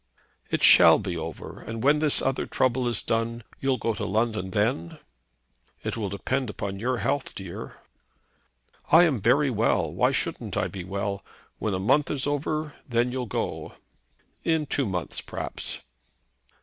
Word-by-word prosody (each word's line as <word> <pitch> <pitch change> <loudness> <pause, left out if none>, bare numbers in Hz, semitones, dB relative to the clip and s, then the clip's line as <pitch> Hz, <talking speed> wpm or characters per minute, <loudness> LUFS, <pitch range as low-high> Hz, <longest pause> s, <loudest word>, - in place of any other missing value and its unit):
"It - - -1
shall - - +9
be - - -4
over. - - -7
And 115 0 -6
when 145 +2 +4
this 150 -2 +4
other 135 0 -1
trouble 130 -1 +1
is 120 -3 -1
done, 115 +1 -1 0.2
you'll 135 -1 +1
go 115 0 -1
to 105 - -5
London 105 -2 0
then?" 105 -4 -1 0.9
"It - - -2
will 105 -4 -3
depend 125 +5 -2
on 100 -1 -3
your 125 +3 0
health, 135 +5 -1
dear." 95 -3 -7 1.2
"I 165 +3 +8
am 145 - +1
very 135 +6 +3
well. 115 0 +1
Why - - +2
shouldn't - - -2
I - - 0
be 95 -3 -6
well? 100 +1 -3 0.4
When 105 -3 -1
a - - -2
month 140 +10 +2
is 140 -3 -1
over, 150 +1 -2 0.2
then 120 +1 +1
you'll 125 -1 -3
go." - - -4 0.7
"In 160 -2 +1
two 140 -3 0
months, 90 -3 -2
perhaps." - - -4
120 Hz, 160 wpm, -26 LUFS, 100-135 Hz, 1.2 s, shall